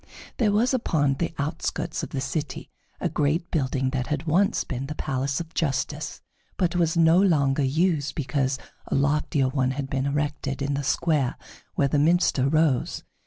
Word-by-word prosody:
There 220 -4 +3
was 230 +6 +2
upon 145 - +1
the 170 - -1
outskirts 160 +2 -2
of - - -5
the 135 - -3
city 150 +3 -4 0.3
a - - 0
great 155 +4 0
building 135 -3 0
that 130 -2 -2
had 150 -1 -2
once 180 +5 +2
been 135 0 -4
the 150 - -5
Palace 135 -1 -1
of 165 -1 -7
Justice, 145 0 -2 0.4
but 180 -2 +1
was 170 -1 +2
no 165 +2 +6
longer 145 -7 +3
used 155 +2 +1
because 135 -2 0 0.3
a - - -1
loftier 140 -1 +2
one 130 -1 +1
had 135 -2 -4
been 135 0 0
erected 145 -1 -2
in 140 +1 -1
the 140 - -1
square 145 -3 +1 0.4
where 140 - +3
the 145 +1 +1
minster 150 -4 +3
rose. 155 -4 +1
145 Hz, 170 wpm, -25 LUFS, 135-165 Hz, 0.4 s, no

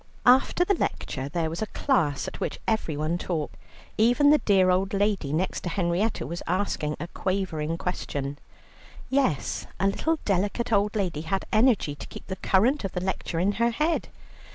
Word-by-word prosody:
After 260 +7 +5
the 400 - +3
lecture 135 - -3
there 165 +1 -1
was 165 - -5
a 220 - -1
class 170 - 0
at - - -7
which - - -3
everyone 165 -6 0
talked. 160 -5 -3 0.4
Even 245 +6 +5
the 300 - +6
dear 190 -3 +4
old 190 +2 +1
lady 200 -8 +1
next 170 +5 -1
to 175 - -3
Henrietta 185 +4 0
was 170 +1 -5
asking 175 -5 -1
a 170 - -4
quavering 165 -5 -2
question. 145 -6 -4 0.7
Yes, 265 - 0
a 195 - +1
little 315 +11 +1
delicate 205 +4 0
old 205 0 +2
lady 180 -7 -1
had 190 +4 -2
energy 220 - +3
to 145 - -9
keep - - -10
the 190 - -4
current 235 +9 +2
of 195 - -3
the - - -1
lecture 185 -3 -2
in 190 +4 +2
her 235 +3 +1
head. 305 +8 0
190 Hz, 175 wpm, -26 LUFS, 165-220 Hz, 0.7 s, the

